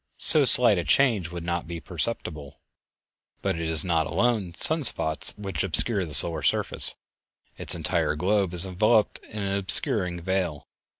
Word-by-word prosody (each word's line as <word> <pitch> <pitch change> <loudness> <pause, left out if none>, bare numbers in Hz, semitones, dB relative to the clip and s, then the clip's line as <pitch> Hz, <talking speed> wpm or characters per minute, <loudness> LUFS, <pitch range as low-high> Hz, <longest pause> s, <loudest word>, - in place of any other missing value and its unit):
So 150 -3 +5
slight 120 -6 +3
a - - -4
change 105 - 0
would 85 -1 -9
not 85 0 -5
be 85 0 -8
perceptible; 75 - -2 0.8
but - - -2
it 85 0 -5
is 80 0 +2
not 80 -3 -1
alone 110 -8 -2
sun 160 - +2
spots 80 - +1
which 95 -6 -5
obscure 95 +2 +1
the 75 -3 -2
solar 80 0 +6
surface, - - +1 0.6
its - - 0
entire - - -2
globe 95 +3 -1
is 85 - +4
enveloped 105 +4 -1
with - - -17
an 100 -1 -3
obscuring 90 -2 -1
veil. 90 -4 -4
90 Hz, 160 wpm, -23 LUFS, 80-105 Hz, 0.8 s, solar